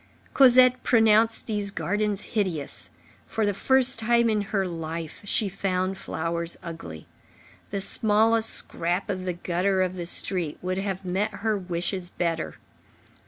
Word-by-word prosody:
Cosette 255 -1 +6
pronounced 225 -1 +3
these 205 -3 -1
gardens 205 0 -2
hideous: 185 -10 -2 0.4
for 220 - -1
the 205 - +1
first 260 +4 +2
time 235 0 +2
in 210 -1 +1
her 200 -1 -1
life, 165 -2 -6
she 205 +1 0
found 190 -1 -2
flowers 170 -2 -4
ugly. 160 - -8 0.6
The 200 -1 -3
smallest 220 +2 +3
scrap 175 +4 +2
of 185 -1 -5
the 180 - -1
gutter 185 +2 0
of 185 0 -3
the 175 -2 -5
street 175 -4 0
would 185 +1 -3
have 195 -1 -4
met 195 +4 -1
her 220 -1 +2
wishes 180 -1 -3
better. 170 -3 -3
195 Hz, 140 wpm, -25 LUFS, 175-215 Hz, 0.6 s, Cosette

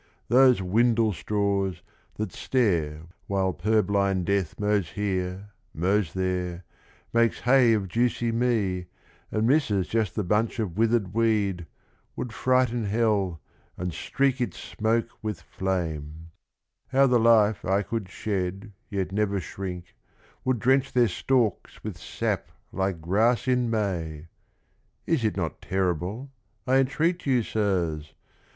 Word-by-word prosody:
Those 125 -3 +5
windlestraws 100 -3 +1 0.3
that 110 - -3
stare 85 - 0 0.2
while 95 -1 0
purblind 100 -3 +1
death 100 -4 -1
Mows 105 -4 +1
here, 95 -1 -2 0.3
mows 95 +2 +1
there, 90 -1 -2 0.5
makes 115 0 +2
hay 125 -2 +5
of 100 -3 0
juicy 120 +3 0
me, 110 -7 0 0.4
And 110 +1 +1
misses 115 - +2
just 110 -4 -1
the 105 - 0
bunch 105 +6 0
of 100 -7 -2
withered 110 -3 +1
weed, 105 -6 +1 0.5
Would 120 - -5
frighten 125 -2 +1
hell 100 -6 +1 0.4
and 90 -1 -3
streak 135 +5 0
its 115 -8 -2
smoke 115 +2 -1
with 105 -5 -3
flame 80 -4 -4 0.6
1 135 +1 +2
How - - +8
the 125 -2 +4
life 110 -3 +4
I 100 +2 +1
could 110 -3 -4
shed 100 +1 -3 0.2
yet 95 -3 -2
never 100 -1 0
shrink, 90 -1 -6 0.5
Would 130 -1 +1
drench 130 +4 +2
their 120 -3 +4
stalks 115 +2 0
with - - -6
sap - - -2 0.2
like 95 -3 -2
grass 110 +10 +2
in 125 -2 +2
May 85 -8 -2
I - - -20 0.8
Is 160 -8 +1
it 110 -2 0
not 80 -6 -3
terrible, 95 - -2 0.3
I 130 +1 +3
entreat 155 +6 +1
you, 125 -3 +3
Sirs? 85 -9 -1
105 Hz, 130 wpm, -26 LUFS, 90-115 Hz, 0.8 s, How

